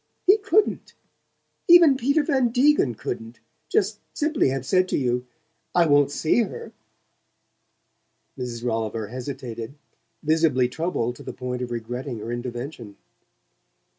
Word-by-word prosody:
He 395 Hz, +3 st, +6 dB
couldn't 415 Hz, 0 st, +1 dB, 0.7 s
even 340 Hz, -5 st, +8 dB
Peter 280 Hz, +5 st, +2 dB
Van 265 Hz, -5 st, +2 dB
Degen 250 Hz, -, +3 dB
couldn't 115 Hz, +1 st, -6 dB, 0.3 s
just 435 Hz, -, +1 dB, 0.2 s
simply 305 Hz, -, +1 dB
have 135 Hz, -1 st, -3 dB
said 185 Hz, +5 st, +2 dB
to -, -, 0 dB
you: 125 Hz, -2 st, -1 dB, 0.5 s
'I 175 Hz, -1 st, +5 dB
wont 145 Hz, -2 st, +4 dB
see 160 Hz, +11 st, +2 dB
her.'" 215 Hz, -, -5 dB, 1.6 s
Mrs. 120 Hz, -3 st, -6 dB
Rolliver 110 Hz, -2 st, -2 dB
hesitated, 125 Hz, -1 st, -6 dB, 0.5 s
visibly 155 Hz, -5 st, +3 dB
troubled 125 Hz, -4 st, -2 dB
to -, -, -11 dB
the -, -, -7 dB
point 125 Hz, 0 st, -5 dB
of 125 Hz, -, -4 dB
regretting 120 Hz, +2 st, -5 dB
her 115 Hz, +2 st, -6 dB
intervention. 120 Hz, -2 st, -6 dB
130 Hz, 125 wpm, -24 LUFS, -, 1.6 s, even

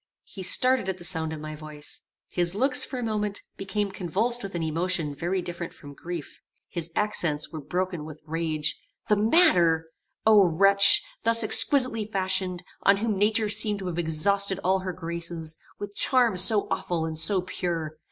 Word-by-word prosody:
He 195 Hz, -, -11 dB
started 255 Hz, +2 st, +2 dB
at 190 Hz, -, -4 dB
the 175 Hz, -, -12 dB
sound 160 Hz, -3 st, -2 dB
of 160 Hz, -, -7 dB
my 155 Hz, 0 st, -8 dB
voice. 150 Hz, -1 st, -7 dB, 0.3 s
His 175 Hz, 0 st, -1 dB
looks, 255 Hz, +3 st, +3 dB
for 260 Hz, -, -6 dB
a 245 Hz, -, -4 dB
moment, 210 Hz, -2 st, -2 dB
became 195 Hz, +1 st, -4 dB
convulsed 215 Hz, +8 st, -2 dB
with 195 Hz, -2 st, -8 dB
an 170 Hz, -, -3 dB
emotion 165 Hz, -1 st, -2 dB
very 175 Hz, +5 st, -3 dB
different 170 Hz, -1 st, -7 dB
from 145 Hz, 0 st, -13 dB
grief. 170 Hz, +1 st, -8 dB, 0.3 s
His 170 Hz, -2 st, -3 dB
accents 170 Hz, -8 st, -1 dB
were 160 Hz, -2 st, -7 dB
broken 175 Hz, +2 st, -4 dB
with 155 Hz, 0 st, -11 dB
rage. 155 Hz, -1 st, -2 dB, 0.3 s
"The 210 Hz, -, +4 dB
matter 180 Hz, -, +3 dB, 0.3 s
O 215 Hz, -2 st, +6 dB
wretch! 195 Hz, +4 st, +6 dB, 0.2 s
thus 230 Hz, 0 st, +5 dB
exquisitely 250 Hz, -1 st, +4 dB
fashioned 185 Hz, -3 st, -2 dB, 0.2 s
on 195 Hz, 0 st, +3 dB
whom 215 Hz, 0 st, -2 dB
nature 215 Hz, +2 st, +1 dB
seemed 210 Hz, 0 st, +2 dB
to 195 Hz, -, -8 dB
have 175 Hz, 0 st, -5 dB
exhausted 190 Hz, +4 st, +1 dB
all 190 Hz, +1 st, +1 dB
her 185 Hz, 0 st, -5 dB
graces; 170 Hz, -2 st, -3 dB, 0.2 s
with 205 Hz, 0 st, -8 dB
charms 240 Hz, -8 st, +2 dB
so 205 Hz, +2 st, +6 dB
awful 165 Hz, -2 st, -2 dB
and 160 Hz, -1 st, -5 dB
so 185 Hz, +4 st, +2 dB
pure! 165 Hz, -4 st, -5 dB
185 Hz, 170 wpm, -25 LUFS, 165-210 Hz, 0.3 s, O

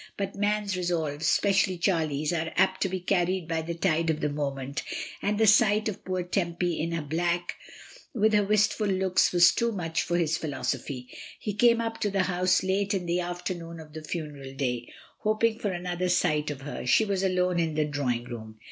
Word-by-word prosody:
But 195 Hz, -1 st, -3 dB
man's 205 Hz, -1 st, 0 dB
resolves, 160 Hz, -4 st, -1 dB
especially 195 Hz, -2 st, +3 dB
Charlie's, 160 Hz, -4 st, 0 dB
are 160 Hz, -1 st, -1 dB
apt 190 Hz, 0 st, +2 dB
to 190 Hz, -, +2 dB
be 185 Hz, +1 st, -2 dB
carried 180 Hz, -1 st, 0 dB
by 165 Hz, -1 st, -1 dB
the 170 Hz, +1 st, -4 dB
tide 165 Hz, -2 st, +1 dB
of 155 Hz, -1 st, 0 dB
the 150 Hz, -, 0 dB
moment, 140 Hz, -1 st, -3 dB, 0.4 s
and 205 Hz, +1 st, 0 dB
the 220 Hz, -, +4 dB
sight 215 Hz, 0 st, +5 dB
of 215 Hz, -, -5 dB
poor 185 Hz, -1 st, -2 dB
Tempy 175 Hz, -1 st, -1 dB
in 165 Hz, +1 st, -2 dB
her 165 Hz, -2 st, -2 dB
black 170 Hz, +3 st, -1 dB, 0.6 s
with 220 Hz, -2 st, +2 dB
her 210 Hz, -1 st, +4 dB
wistful 210 Hz, +1 st, +2 dB
looks 190 Hz, -1 st, +2 dB
was 175 Hz, 0 st, +7 dB
too 235 Hz, 0 st, 0 dB
much 165 Hz, -5 st, -2 dB
for 175 Hz, +2 st, 0 dB
his 160 Hz, -2 st, +1 dB
philosophy. 140 Hz, -4 st, -4 dB, 0.2 s
He 210 Hz, -, -3 dB
came 235 Hz, +3 st, +4 dB
up 225 Hz, -1 st, -3 dB
to 205 Hz, -, 0 dB
the 195 Hz, -1 st, +1 dB
house 180 Hz, 0 st, +2 dB
late 200 Hz, +2 st, 0 dB
in 180 Hz, -2 st, -2 dB
the 175 Hz, +1 st, 0 dB
afternoon 175 Hz, -1 st, -5 dB
of 155 Hz, -1 st, -12 dB
the 160 Hz, -, -6 dB
funeral 150 Hz, -4 st, -6 dB
day, 125 Hz, -3 st, -2 dB, 0.3 s
hoping 220 Hz, +1 st, +1 dB
for 205 Hz, -, -1 dB
an 180 Hz, -1 st, -4 dB
other 180 Hz, 0 st, -1 dB
sight 150 Hz, -3 st, +2 dB
of 140 Hz, -2 st, -5 dB
her. 145 Hz, +2 st, -6 dB
She 220 Hz, -, +5 dB
was 200 Hz, -2 st, -1 dB
alone 180 Hz, -2 st, +1 dB
in 160 Hz, -2 st, 0 dB
the 155 Hz, 0 st, +2 dB
drawing 135 Hz, -5 st, -1 dB
room. 110 Hz, -3 st, -8 dB
175 Hz, 200 wpm, -27 LUFS, 155-195 Hz, 0.6 s, was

